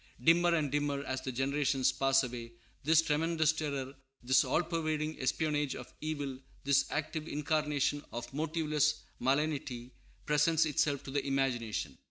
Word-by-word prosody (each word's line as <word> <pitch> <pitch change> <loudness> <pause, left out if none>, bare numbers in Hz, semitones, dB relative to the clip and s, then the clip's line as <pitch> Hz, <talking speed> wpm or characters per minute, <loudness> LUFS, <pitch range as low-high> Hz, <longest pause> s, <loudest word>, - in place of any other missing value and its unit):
Dimmer 170 +1 +4
and 150 -4 0
dimmer, 145 -1 0
as 130 -1 -3
the 130 - -4
generations 135 0 +1
pass 135 0 +3
away, 120 -2 -6 0.3
this 160 +2 +5
tremendous 160 0 +2
terror, 140 -4 -3 0.3
this 130 +2 +4
all 175 - +1
pervading 155 -2 -2
espionage 150 +1 0
of 125 - -9
evil, 145 -4 -3 0.2
this 140 0 +3
active 155 +1 -3
incarnation 150 -1 0
of 120 +1 -6
motiveless 155 0 0 0.2
malignity, 135 -3 -1 0.3
presents 150 +2 +3
itself 145 -2 +1
to 135 - -7
the 140 0 0
imagination. 130 -5 -1
145 Hz, 140 wpm, -32 LUFS, 135-155 Hz, 0.3 s, this